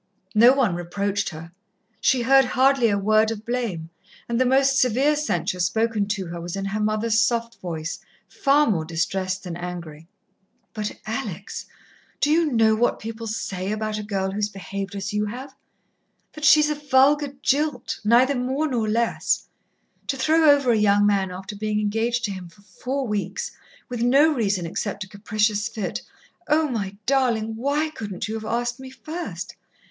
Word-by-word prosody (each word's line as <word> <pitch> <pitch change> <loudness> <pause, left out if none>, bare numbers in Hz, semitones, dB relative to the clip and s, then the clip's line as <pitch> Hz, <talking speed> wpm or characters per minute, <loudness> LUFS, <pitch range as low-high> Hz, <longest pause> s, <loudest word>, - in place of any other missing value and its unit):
No 235 +4 +7
one 255 -9 +2
reproached 200 +3 -2
her, 165 0 -10 0.5
she 255 -2 +2
heard 270 +2 +6
hardly 260 -1 +3
a 200 - +1
word 215 +2 +3
of 220 -1 -5
blame, 220 -10 -3 0.4
and 235 +1 0
the 255 - +3
most 270 +1 +4
severe 260 +5 +3
censure 185 - -1
spoken 220 +3 +1
to 200 -2 -2
her 170 0 -6
was 175 +1 -5
in 195 0 -3
her 200 +2 -2
mother's 215 +1 +1
soft 230 +2 0
voice, 165 -2 -4 0.3
far 285 +1 +3
more 185 - +1
distressed 185 +3 -2
than 175 -3 -5
angry. 170 -3 -7 0.7
"But, 210 -1 -4
Alex, - - -5 0.5
do 295 - +2
you 320 -1 +3
know 225 -2 +4
what 235 +3 +1
people 225 +1 -7
say, 195 -3 -3
about 215 0 -2
a - - -5
girl 195 -2 -2
who's 210 +1 -1
behaved 195 0 -6
as 200 +1 -4
you 210 0 0
have? 260 +5 -7 0.8
That 305 -1 -4
she's 300 0 +6
a - - +2
vulgar 285 0 +3
jilt, 290 -3 0
neither 240 +6 +4
more 265 +4 -1
nor 235 -6 -1
less. 230 +2 0 0.6
To 275 - -1
throw 315 +3 +4
over 280 -4 +5
a - - +4
young 205 -1 +4
man 200 -2 +2
after 190 +3 -7
being 210 +1 -1
engaged 225 +3 0
to 205 - -3
him 185 -3 -7
for 200 +4 -22
four 265 +6 -4
weeks, 205 -4 -3 0.4
with 245 -2 -4
no 275 +6 +5
reason 200 - 0
except 200 +4 -3
a - - -11
capricious 210 +1 0
fit.... 215 -5 -4 0.5
Oh, 310 +1 +3
my 200 -6 -3
darling, 235 -5 +1
why 285 +6 0
couldn't 205 - -5
you 215 - -4
have 220 -1 -5
asked 240 +2 -2
me 265 0 -9
first? 315 +6 -7
220 Hz, 175 wpm, -23 LUFS, 200-260 Hz, 0.8 s, No